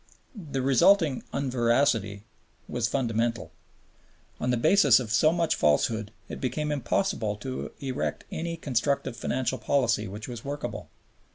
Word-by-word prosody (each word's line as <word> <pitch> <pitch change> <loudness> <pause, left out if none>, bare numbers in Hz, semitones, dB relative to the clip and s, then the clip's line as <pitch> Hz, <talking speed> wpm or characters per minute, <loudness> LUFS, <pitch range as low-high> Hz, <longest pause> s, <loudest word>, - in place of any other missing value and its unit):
The 145 - -4
resulting 140 +2 +4
unveracity 120 -6 +1 0.4
was 120 -2 -1
fundamental. 115 - -1 0.9
On 125 - 0
a 125 - +1
basis 145 - +5
of 115 -4 -5
so 155 +8 +4
much 170 -1 +1
falsehood 105 +8 +1 0.2
it - - -7
became 150 +4 -2
impossible 120 - -1
to 130 +5 -5
erect 135 -1 -3
any 165 +1 -3
constructive 140 -3 -1
financial 130 +1 -2
policy 115 -3 +1
which 105 +3 -7
was 120 -2 -7
workable. 145 +1 -5
125 Hz, 125 wpm, -27 LUFS, 115-145 Hz, 0.9 s, basis